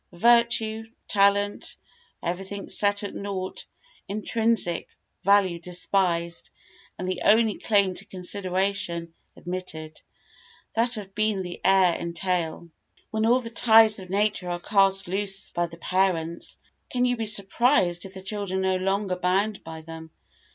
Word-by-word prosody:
Virtue, 225 +2 +2 0.2
talent, 200 0 +2 0.5
everything 195 +3 -4
set 205 0 +1
at 205 - -5
naught 195 -2 -5 0.4
intrinsic 215 -3 0 0.4
value 195 -3 +3
despised 175 -1 -1 0.5
and 185 - -4
the 185 - -2
only 220 0 +4
claim 200 -3 +2
to 180 - -6
consideration 185 -2 -2 0.2
admitted, 160 -4 -6 0.7
that 235 +1 +1
of 195 -2 -8
being 215 -2 0
the 175 -1 -7
heir 190 -2 +5
entail. 170 -1 -2 0.4
When 220 0 +1
all 250 +2 +4
the 230 -1 -7
ties 220 -2 +5
of 185 -1 -10
nature 200 -2 0
are 175 0 -2
cast 195 0 +2
loose 195 +1 -2
by 175 0 -1
the 170 0 -12
parents, 175 -2 -1 0.3
can 250 0 +1
you 245 0 +2
be 225 -2 -3
surprised 200 -3 +2
if 195 0 -10
the 190 - -8
children 190 -2 -2
are 185 -1 +1
no - - -5
longer 195 -1 0
bound 195 +3 0
by 160 0 -8
them? 160 0 -10
195 Hz, 135 wpm, -25 LUFS, 180-210 Hz, 0.7 s, heir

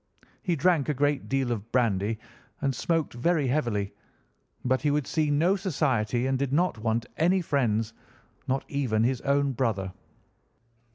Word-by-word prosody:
He 180 -4 0
drank 160 -1 +2
a 150 - +1
great 145 +1 0
deal 135 -2 +1
of 115 0 -4
brandy 110 -3 +1 0.4
and 135 -1 0
smoked 165 +4 0
very 150 +5 +1
heavily, 110 -8 0 0.7
but 130 +1 +2
he 150 - +2
would 145 -1 +1
see 155 +1 0
no 165 +7 +3
society 130 - 0
and 135 0 0
did 140 -1 -1
not 165 -4 +1
want 115 +1 0
any 180 +4 +3
friends, 115 - 0 0.5
not 135 +1 0
even 125 -6 0
his 125 +1 +1
own 140 0 +2
brother. 110 -7 -1
135 Hz, 155 wpm, -27 LUFS, 115-150 Hz, 0.7 s, no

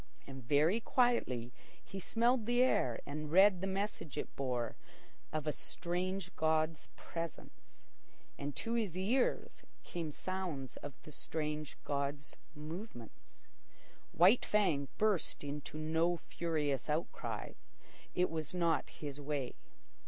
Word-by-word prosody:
And 135 -1 -8
very 150 - +4
quietly 215 - +2 0.3
he 195 - -6
smelled 235 +3 +2
the 245 +1 +5
air 125 - +2
and 150 +1 -4
read 190 +1 +7
the 195 - 0
message 195 -5 -2
it - - -4
bore 125 -4 -1 0.6
of 155 -2 -2
a 150 - +2
strange 180 +3 -2
god's 155 -1 +1
presence. 165 -1 -7 0.5
And 140 -1 -4
to 230 - -1
his 210 -7 0
ears 235 +8 +1 0.2
came 165 -3 -4
sounds 170 -7 -3
of 140 -2 -7
the 155 - -10
strange 150 0 -3
god's 140 0 -2 0.2
movements. 155 - -9 0.7
White 185 +9 +6
Fang 175 -10 +2
burst 210 -8 +1
into 145 +1 -5
no 160 +3 +2
furious 150 -6 -1
outcry. 155 +3 -2 0.6
It 180 -2 +3
was 160 +1 -2
not 170 -2 +2
his 145 -1 -6
way. 140 -3 -2
160 Hz, 125 wpm, -36 LUFS, 145-190 Hz, 0.7 s, read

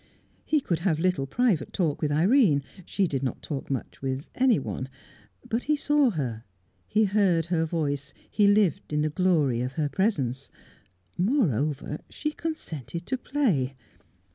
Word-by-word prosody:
He 305 -2 +2
could 170 -9 -1
have 170 -3 +1
little 165 -5 +1
private 225 - +1
talk 165 -7 0
with 150 - 0
Irene; 170 - +4 0.2
she 200 - +1
did 135 -6 -2
not 130 - -3
talk 140 -4 -5
much 135 -2 -4
with 135 +1 -3
anyone; 220 - +1 0.6
but 230 +1 -1
he 300 - +3
saw 295 -2 +3
her, 125 - -3 0.4
he 220 - +3
heard 190 -5 +2
her 165 -1 +1
voice, 145 -4 -2 0.2
he 205 -2 +3
lived 200 -8 +2
in 150 0 +2
the 155 - +1
glory 150 -8 +2
of 125 +1 -3
her 150 0 -1
presence. 135 - -1 0.7
Moreover, 155 - +1
she 300 - -3
consented 170 - -5
to 260 - -1
play. 210 - 0
165 Hz, 150 wpm, -27 LUFS, 140-215 Hz, 0.7 s, Irene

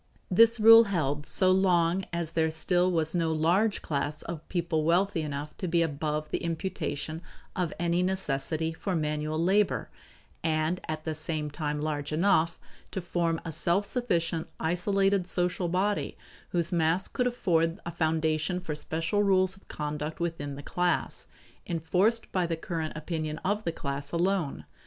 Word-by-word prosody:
This 230 +4 +6
rule 225 +1 +9
held 150 -7 -1
so 185 -1 +5
long 185 -1 +3
as 170 -2 -3
there 160 -1 +1
still 175 +3 +1
was 160 -2 +1
no 165 -2 +1
large 175 +7 +2
class 145 0 -2
of 165 -2 -7
people 170 -3 0
wealthy 175 +2 +2
enough 145 0 -5
to 185 - -3
be 170 0 +3
above 150 0 -2
the - - 0
imputation 160 -2 -3 0.3
of 180 -4 -1
any 175 0 +1
necessity 160 -3 -1
for 185 +3 -3
manual 150 0 -1
labor 180 - +1 0.5
and 160 +2 0
at 155 0 -4
the 160 - -2
same 155 -1 -3
time 150 0 -3
large 150 -2 -2
enough 165 0 +2 0.3
to - - -4
form 170 -2 -1
a 165 - -3
self 175 +6 +1
sufficient, 170 -9 -1
isolated 195 +3 +1
social 180 0 +1
body 190 +4 0 0.3
whose 170 -1 +1
mass 170 +2 +1
would 250 -1 +2
afford 170 -7 +1
a 170 - -3
foundation 160 +1 0
for 175 -4 -4
special 165 +6 -1
rules 190 -2 +3
of 195 - -21
conduct 150 +1 -4
within 165 -5 -3
the 145 - -9
class, 175 +2 -1 0.4
enforced 180 +7 +1
by 180 -2 +1
the 165 -1 -2
current 160 -1 -4
opinion 155 0 -3
of 205 +3 0
the 165 - 0
class 140 -2 -4
alone. 170 - 0
165 Hz, 155 wpm, -28 LUFS, 155-185 Hz, 0.5 s, rule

